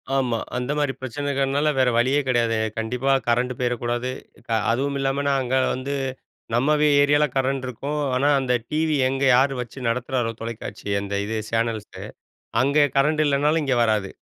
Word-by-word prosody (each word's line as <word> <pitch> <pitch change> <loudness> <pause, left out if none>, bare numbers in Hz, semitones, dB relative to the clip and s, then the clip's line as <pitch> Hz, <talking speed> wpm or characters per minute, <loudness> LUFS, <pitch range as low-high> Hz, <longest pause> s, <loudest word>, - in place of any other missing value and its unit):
ஆமா. 125 -4 +1 0.2
அந்த 125 +3 -2
மாரி 145 -2 0
பிரச்சனைகள்னால 140 +2 -1
வேற 130 -1 +4
வழியே 130 +5 +3
கெடையாது. 120 -3 +1 0.2
கண்டிப்பா 125 +4 -1 0.2
கரண்ட் 125 +2 +1
போயிறக்கூடாது. 120 0 -1 0.6
அதுவும் 140 +4 -1
இல்லாம 135 +1 0
நாங்க 130 -2 -1 0.2
வந்து 130 +2 -4 0.6
நம்ம 135 +6 +3 0.3
ஏரியாவில 145 +1 +4
கரண்ட் 135 0 0
இருக்கும். 140 +5 -4 0.2
ஆனா 140 +3 +2
அந்த 130 -2 0 0.2
டிவி 155 0 +1
எங்க 135 +1 -2
யாரு 135 +2 +3
வச்சு 120 +2 -9
நடத்துறாரோ 120 0 -1
தொலைக்காட்சிய 110 -3 -4
அந்த 100 0 -4
இது 110 +2 -3
சேனல்ஸ், 115 -2 -2 0.6
அங்கே 140 +3 +3
கரண்ட் 150 +3 +3
இல்லனாலும் 145 +3 +2
இங்க 135 -3 +1
வராது. 105 -4 +1
130 Hz, 145 wpm, -23 LUFS, 120-140 Hz, 0.6 s, வேற